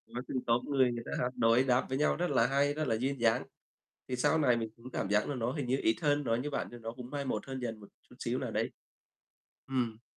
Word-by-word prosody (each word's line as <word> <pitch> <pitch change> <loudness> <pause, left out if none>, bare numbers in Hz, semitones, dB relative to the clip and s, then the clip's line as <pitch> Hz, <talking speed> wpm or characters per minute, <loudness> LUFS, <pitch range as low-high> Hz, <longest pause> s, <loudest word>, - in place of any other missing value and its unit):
Có 125 - -2
từng 130 - -3
tốp 115 +1 +3
người 130 -3 +3
người 120 -1 -4
ta - - -6
hát 125 - +1
đối 115 +3 +5
đáp 125 -1 +2
với 130 - 0
nhau 150 - +3
rất 175 +1 -1
là 125 -4 +4
hay, 140 +2 +2
rất 155 0 -2
là 115 - +2
duyên 130 +3 -1
dáng. 115 +1 +3 0.6
Thì 130 - -2
sau 145 +5 +3
này 125 -6 +4
mình 115 -1 -2
cũng 120 +2 -11
cảm 95 - -2
giác 105 +1 +2
là 145 - -1
nó 120 0 -1
hình 140 -5 -3
như 130 - +2
ít 110 - +4
hơn, 145 -1 +2
nói 115 -3 +1
như 145 +4 -2
bạn 140 - -2
thì 120 - -8
nó 115 0 -4
cũng 120 +1 -9
mai 145 -1 -3
một - - -2
hơn 130 0 -4
dần 115 -3 -4
một 100 - -13 0.2
chút - - -15
xíu - - -1
nào - - -3
đấy. - - -1 1.0
Ừm. 120 -4 -1
125 Hz, 275 wpm, -32 LUFS, 115-140 Hz, 1.0 s, đối